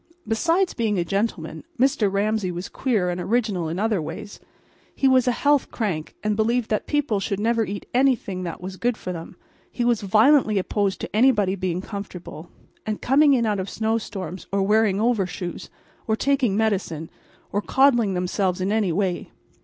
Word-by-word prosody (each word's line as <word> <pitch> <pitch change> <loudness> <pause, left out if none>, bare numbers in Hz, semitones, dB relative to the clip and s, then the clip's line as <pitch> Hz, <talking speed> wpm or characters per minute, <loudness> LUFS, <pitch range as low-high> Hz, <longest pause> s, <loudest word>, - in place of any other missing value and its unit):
Besides 335 +11 +1
being 220 -4 0
a 175 - 0
gentleman, 200 +5 -2 0.2
Mr. 255 -6 +3
Ramsay 205 -1 0
was 175 +2 -6
queer 210 -9 0
and 175 0 -3
original 205 -6 0
in 165 - -3
other 210 -2 +1
ways. 200 +6 -7 0.6
He 270 - +2
was 260 -1 +4
a - - +5
health 285 +3 +2
crank, 180 -9 -3
and 210 0 +1
believed 225 +2 0
that 215 - 0
people 290 -9 0
should 200 0 -2
never 230 +1 +2
eat 205 -1 -5
anything 245 -8 +1
that 175 -1 -5
was 185 +1 -7
good 240 +1 0
for 180 - -5
them. 165 -1 -8 0.4
He 240 - -2
was 240 -2 +2
violently 215 +3 +4
opposed 195 +1 -1
to - - -6
anybody 215 -5 +4
being 185 -2 -2
comfortable, 180 -5 -8 0.3
and 215 -1 -3
coming 285 +3 +4
in 235 -2 +1
out 210 -2 0
of 190 +1 -4
snow 225 +1 0
storms, 185 -4 -7
or 195 0 +1
wearing 210 -1 +3
overshoes, 195 -6 -1 0.4
or 220 - +2
taking 260 -5 +1
medicine, 185 -8 -1 0.4
or 205 - 0
coddling 240 -6 +3
themselves 180 +1 0
in 190 +2 -1
any 210 -4 +1
way. 185 0 -1
210 Hz, 175 wpm, -23 LUFS, 185-235 Hz, 0.6 s, a